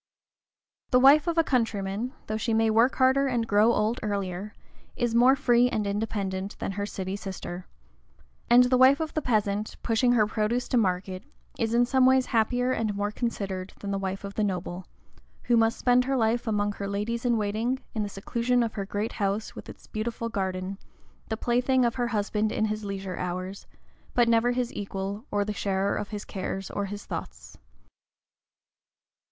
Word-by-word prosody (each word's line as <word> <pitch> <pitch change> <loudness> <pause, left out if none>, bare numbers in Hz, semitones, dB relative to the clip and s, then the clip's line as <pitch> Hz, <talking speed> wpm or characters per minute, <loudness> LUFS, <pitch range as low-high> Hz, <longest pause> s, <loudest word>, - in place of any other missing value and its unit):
The 250 - +5
wife 285 +4 +6
of 340 - +1
the 330 - +4
countryman, 225 -3 -1
though 215 - -3
she 220 +1 0
may 225 0 +3
work 230 +4 +4
harder 265 +1 +3
and 240 -3 0
grow 210 +3 +4
old 220 +1 0
earlier, 200 -1 -3 0.4
is 240 -2 -1
more 250 +3 +6
free 245 -3 +3
and 215 -4 -1
independent 200 -2 -3
than - - -3
her 200 +1 -3
city 190 -1 -4
sister; 190 -3 -7 0.8
and 245 +1 +8
the 250 0 +2
wife 265 +3 +6
of 315 -1 -3
the 310 - -1
peasant, 210 -4 0
pushing 245 +2 +2
her 220 -3 +4
produce 220 +3 -1
to 250 - +2
market, 185 -3 0 0.4
is 230 0 0
in 240 +1 +5
some 260 +1 +4
ways 260 0 +4
happier 245 +2 +1
and 220 -4 -1
more 205 +1 -1
considered 195 -5 -4
than 200 - -4
the 195 - -1
wife 195 0 -4
of 200 0 -6
the 215 - -1
noble, 180 -2 -3 0.6
who 240 - +2
must 225 0 +3
spend 250 0 +3
her 270 0 0
life 230 +1 +1
among 205 -1 +1
her 200 0 -5
ladies 210 +4 -2
in 240 -2 +2
waiting, 220 +5 -1 0.2
in 220 - -1
the 205 - -2
seclusion 235 +5 0
of 230 - -3
her 200 -3 -4
great 210 +2 -2
house 205 +1 -2
with - - -10
its - - -12
beautiful 230 +1 -4
garden, 190 -2 -3 0.5
the 220 - -2
plaything 250 +2 +2
of 235 - +1
her 245 -1 -1
husband 215 -1 0
in 220 - 0
his 215 0 -3
leisure 195 -2 -5
hours, 185 +2 -5 0.5
but 240 -1 +4
never 230 +1 +3
his 245 -1 -2
equal, 200 +2 -5
or 205 0 0
the 210 - -3
sharer 195 -1 0
of 205 - -4
his 210 -1 -6
cares 190 0 -5
or 200 - -2
of - - -7
his 205 0 -7
thoughts. - - -7
215 Hz, 190 wpm, -27 LUFS, 200-240 Hz, 0.8 s, and